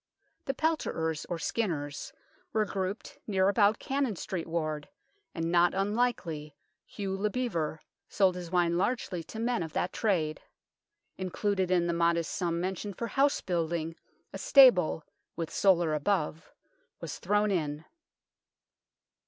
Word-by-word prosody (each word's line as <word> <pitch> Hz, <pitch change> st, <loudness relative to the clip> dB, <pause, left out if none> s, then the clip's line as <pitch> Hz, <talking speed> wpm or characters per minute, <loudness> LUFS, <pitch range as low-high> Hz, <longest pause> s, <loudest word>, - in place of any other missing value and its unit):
The 270 Hz, -, -1 dB
pelterers, 165 Hz, -, -1 dB
or 175 Hz, -, -1 dB
skinners, 160 Hz, -7 st, -2 dB, 0.4 s
were 215 Hz, -1 st, +2 dB
grouped 195 Hz, +1 st, -4 dB
near 190 Hz, -2 st, +2 dB
about 205 Hz, +1 st, +4 dB
Cannon 270 Hz, -5 st, -1 dB
Street 175 Hz, -1 st, -4 dB
ward, 155 Hz, -3 st, -2 dB, 0.5 s
and 165 Hz, -1 st, -1 dB
not 175 Hz, +1 st, +4 dB
unlikely 195 Hz, -, -1 dB, 0.3 s
Hugh 195 Hz, -2 st, -4 dB
le 205 Hz, +2 st, 0 dB
Bevere 185 Hz, -11 st, -1 dB, 0.3 s
sold 190 Hz, -3 st, +3 dB
Ms 175 Hz, -2 st, -6 dB
wine 175 Hz, -1 st, +2 dB
largely 195 Hz, -5 st, -1 dB
to 220 Hz, -, -9 dB
men 235 Hz, 0 st, 0 dB
of 160 Hz, -2 st, -5 dB
that 180 Hz, -, -1 dB
trade. 165 Hz, -8 st, 0 dB, 0.8 s
Included 190 Hz, 0 st, 0 dB
in 180 Hz, -2 st, +3 dB
the 170 Hz, -, 0 dB
modest 170 Hz, -1 st, +1 dB
sum 170 Hz, -2 st, -1 dB
mentioned 190 Hz, +2 st, -3 dB
for 235 Hz, -, -3 dB
house 280 Hz, +1 st, +2 dB
building 165 Hz, -2 st, -1 dB, 0.4 s
a -, -, -5 dB
stable, 235 Hz, -, +6 dB, 0.3 s
with 165 Hz, -1 st, -4 dB
solar 175 Hz, -5 st, +3 dB
above, 155 Hz, +1 st, -1 dB, 0.5 s
was -, -, -6 dB
thrown 210 Hz, 0 st, +2 dB
in. 155 Hz, -4 st, -2 dB
180 Hz, 135 wpm, -30 LUFS, 165-210 Hz, 0.8 s, stable